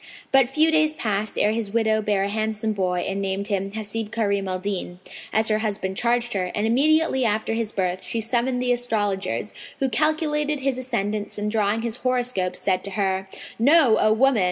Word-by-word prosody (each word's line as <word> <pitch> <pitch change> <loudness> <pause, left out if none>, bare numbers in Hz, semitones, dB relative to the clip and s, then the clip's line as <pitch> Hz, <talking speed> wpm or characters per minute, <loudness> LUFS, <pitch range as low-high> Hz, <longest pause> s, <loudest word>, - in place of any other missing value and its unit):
But 270 -2 +5
few 310 +4 +3
days 310 -1 +3
passed 210 -4 -2
ere 210 - +3
his 220 -2 -2
widow 220 -1 +2
bare 205 -2 +1
a - - 0
handsome 215 +1 -2
boy 180 -3 -1
and 195 +1 -2
named 195 +1 -2
him 195 -1 -1
Hasib 215 0 -4
Karim 200 -3 0
al 185 0 -2
Din, 185 -2 -4 0.3
as 220 +1 +1
her 215 0 +2
husband 200 -3 -2
charged 240 +1 +1
her; 190 -2 0
and 210 - 0
immediately 280 +3 +3
after 220 0 0
his 225 -1 -2
birth 185 -2 -2
she 230 - -2
summoned 245 +2 0
the 250 - +1
astrologers, 210 -5 -2 0.2
who 270 -2 0
calculated 300 +2 0
his 265 -1 -1
ascendants 210 -5 -3
and 210 0 -2
drawing 215 0 0
his 235 0 -3
horoscope, 245 -8 -1
said 185 -2 -1
to 200 - -4
her, 190 -1 -1 0.3
"Know, 265 -2 +5
O 215 - +3
woman! 250 +2 +3
220 Hz, 190 wpm, -23 LUFS, 200-250 Hz, 0.3 s, But